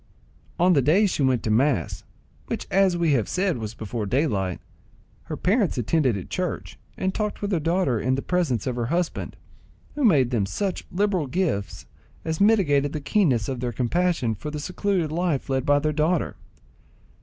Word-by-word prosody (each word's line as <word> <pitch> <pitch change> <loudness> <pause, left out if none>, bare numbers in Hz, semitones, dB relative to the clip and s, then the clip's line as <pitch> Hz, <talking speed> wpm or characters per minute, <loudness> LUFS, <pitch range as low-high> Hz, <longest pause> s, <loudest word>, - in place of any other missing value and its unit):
On 180 +1 +4
the 140 - +4
days 180 - +3
she - - -2
went 130 -3 +2
to 110 - 0
mass, 115 - +1 0.4
which - - -3
as 190 -2 +3
we 170 -2 +2
have 115 -6 +1
said 185 -7 0
was 110 0 -5
before 110 -1 -4
daylight, 100 - 0 0.7
her - - -5
parents 200 - +1
attended 125 -1 +1
at 90 - -8
church - - -4 0.2
and 190 0 -1
talked 210 -1 -2
with 205 0 -3
their 175 - +2
daughter 165 -7 +1
in 130 +3 +1
presence 135 - -1
of 125 - -2
her 120 -1 -1
husband, 170 +4 -2 0.6
who 295 - -2
made 140 - +4
them 105 -5 +1
such 190 - -3
liberal 190 -5 0
gifts 155 - -2 0.4
as 160 +1 -2
mitigated 150 -10 +3
the 155 - -2
keenness 140 - +1
of 130 -2 -3
their 120 0 -2
compassion 130 0 0
for 150 +8 -6
the 150 0 -5
secluded 180 0 -1
life 165 -5 -1
led 130 -1 0
by 145 0 +5
their 150 +1 0
daughter. 155 +2 0
150 Hz, 180 wpm, -24 LUFS, 125-180 Hz, 0.7 s, by